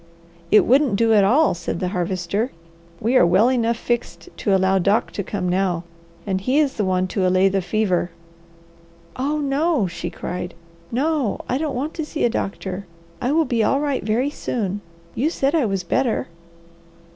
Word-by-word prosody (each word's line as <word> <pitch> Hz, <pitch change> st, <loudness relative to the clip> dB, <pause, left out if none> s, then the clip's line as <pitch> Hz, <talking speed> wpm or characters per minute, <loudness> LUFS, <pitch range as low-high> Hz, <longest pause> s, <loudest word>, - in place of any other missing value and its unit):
"It 210 Hz, -, +6 dB
wouldn't 265 Hz, -3 st, +4 dB
do 225 Hz, +2 st, +3 dB
at 205 Hz, -2 st, +5 dB
all," 275 Hz, +11 st, +4 dB
said 170 Hz, 0 st, -4 dB
the 180 Hz, -, -1 dB
Harvester. 185 Hz, +5 st, -2 dB, 0.5 s
"We 235 Hz, +5 st, 0 dB
are -, -, +6 dB
well 195 Hz, +8 st, +4 dB
enough 235 Hz, -2 st, +1 dB
fixed 170 Hz, -8 st, -3 dB
to 200 Hz, -, +1 dB
allow 190 Hz, 0 st, +3 dB
Doc 200 Hz, +5 st, +1 dB
to 200 Hz, -, -4 dB
come 190 Hz, -1 st, -3 dB
now, 180 Hz, -2 st, 0 dB, 0.4 s
and 190 Hz, -2 st, -1 dB
he 255 Hz, +8 st, +1 dB
is 290 Hz, -3 st, +3 dB
the 210 Hz, -, -1 dB
one 185 Hz, -1 st, +1 dB
to 185 Hz, -1 st, 0 dB
allay 185 Hz, +1 st, +4 dB
the 195 Hz, 0 st, 0 dB
fever." 185 Hz, -2 st, 0 dB, 1.1 s
"Oh 285 Hz, +4 st, -1 dB
no!" 285 Hz, -, +1 dB
she 175 Hz, -1 st, -5 dB
cried. 180 Hz, 0 st, -5 dB, 0.4 s
"No! 275 Hz, -2 st, 0 dB
I 255 Hz, -, 0 dB
don't 305 Hz, -3 st, -2 dB
want 285 Hz, +6 st, -3 dB
to 320 Hz, -, -3 dB
see 300 Hz, -, -1 dB
a 235 Hz, -, +2 dB
doctor. 195 Hz, -1 st, -4 dB, 0.3 s
I 250 Hz, -, 0 dB
will 320 Hz, +1 st, +3 dB
be 235 Hz, -5 st, +1 dB
all 275 Hz, -, +2 dB
right 285 Hz, -2 st, -1 dB
very 235 Hz, +7 st, 0 dB
soon. 205 Hz, -8 st, -3 dB, 0.3 s
You 285 Hz, +7 st, +1 dB
said 275 Hz, -3 st, 0 dB
I 315 Hz, -6 st, +3 dB
was 195 Hz, -2 st, -2 dB
better." 240 Hz, +6 st, 0 dB
215 Hz, 180 wpm, -22 LUFS, 185-265 Hz, 1.1 s, It